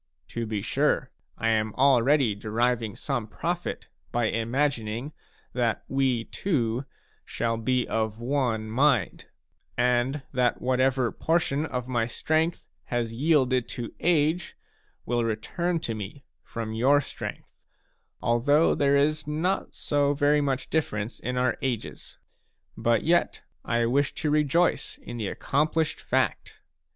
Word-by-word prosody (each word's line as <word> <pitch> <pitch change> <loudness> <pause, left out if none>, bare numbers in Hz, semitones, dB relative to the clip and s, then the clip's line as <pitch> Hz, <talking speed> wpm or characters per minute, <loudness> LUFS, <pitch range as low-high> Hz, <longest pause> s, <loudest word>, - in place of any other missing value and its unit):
To 115 -1 -3
be 105 -2 -2
sure, - - +1 0.3
I 115 - 0
am 110 -1 +1
already 135 -2 +4
deriving 115 +1 -1
some 120 -6 -3
profit 175 +8 -3 0.2
by 120 -2 +1
imagining 120 +2 -1 0.4
that 120 -4 0
we 130 -4 +1
two 125 - -1 0.4
shall 115 -1 -1
be 125 +2 0
of 110 -1 -1
one 120 -4 0
mind, 125 -1 +1 0.5
and 125 +3 +1
that 125 -1 +2
whatever 130 0 +1
portion 160 -2 0
of 125 -3 -4
my 120 -3 0
strength 160 +7 -1 0.2
has 120 -2 -2
yielded 130 -2 +2
to 120 -2 -5
age 165 0 +1 0.5
will 120 0 0
return 165 - -1
to 115 - -2
me 110 +6 -7 0.2
from 115 -1 -5
your 130 +6 +4
strength, 145 - -7 0.7
although 145 +7 +3
there 140 0 +3
is 150 +1 +1
not 165 +6 -1
so 145 0 +1
very 145 +1 +3
much 135 -2 -2
difference 110 -8 -1
in 125 +2 -3
our 125 0 +1
ages. 125 -4 -4 0.6
But 115 -1 +1
yet 170 +2 +2 0.2
I 115 0 +1
wish 140 +4 +1
to 150 - -1
rejoice 150 +3 +2
in 120 - -8
the 110 -3 -2
accomplished 155 +8 0
fact. - - -1
125 Hz, 130 wpm, -27 LUFS, 115-145 Hz, 0.7 s, already